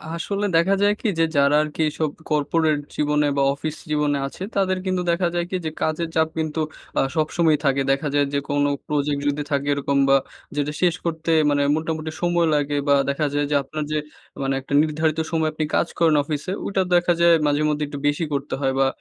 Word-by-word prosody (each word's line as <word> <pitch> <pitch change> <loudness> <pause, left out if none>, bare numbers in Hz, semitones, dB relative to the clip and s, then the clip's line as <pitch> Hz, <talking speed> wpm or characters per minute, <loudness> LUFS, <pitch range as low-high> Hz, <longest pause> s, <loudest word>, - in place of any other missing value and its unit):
আসলে 200 +5 -2
দেখা 170 +4 +4
যায় 205 0 +4
কি? - - -1
যে - - +5
যারা 140 +1 +4
আরকি 155 +1 -5
এইসব 155 0 -1 0.2
কর্পোরেট 150 +1 +1 0.2
জীবনে 150 0 +1
বা, - - +3
অফিস 155 +2 -5
জীবনে 150 -1 +1
আছে, 160 - -8
তাদের 190 -1 +1
কিন্তু 185 -1 0
দেখা 175 +1 +1
যায় 175 0 0
কি? 185 - -3
যে 155 - -2
কাজের 160 +1 -1
চাপ 160 0 +3
কিন্তু 160 0 -1 0.4
আ - - +4
সবসময়ই 155 0 +2
থাকে। 135 0 +2
দেখা 140 +3 0
যায় 145 0 +3
যে 140 - +2
কোনো 145 0 +2 0.2
প্রজেক্ট 145 -1 0
যদি 145 +1 -2
থাকে 140 0 0
এরকম 140 0 -1
বা, 135 - +6 0.4
যেটা 145 0 -1
শেষ 175 -2 +3
করতে 165 0 -1 0.2
মানে 145 0 +2
মোটামুটি 160 0 -3
সময় 175 -1 +2
লাগে 145 0 0
বা, 140 - +5
দেখা 140 +2 0
যায় 145 0 +1
যে - - +2
আপনার 150 +3 -5
যে 155 - +1 0.4
মানে 135 0 0
একটা 135 - -7
নির্ধারিত 155 +1 0
সময় 160 -1 +1
আপনি 155 0 -2
কাজ - - +2
করেন 165 -3 +4
অফিসে, 150 +4 -4
ওইটা 195 -1 0
দেখা 175 0 +3
যায় 170 0 +6
মাঝেমধ্যেই 150 +1 +1
একটু 145 0 -7
বেশি 145 +3 0
করতে 140 +1 -3
হয় 135 -1 +1
বা, 135 - +4
155 Hz, 205 wpm, -22 LUFS, 145-165 Hz, 0.4 s, বা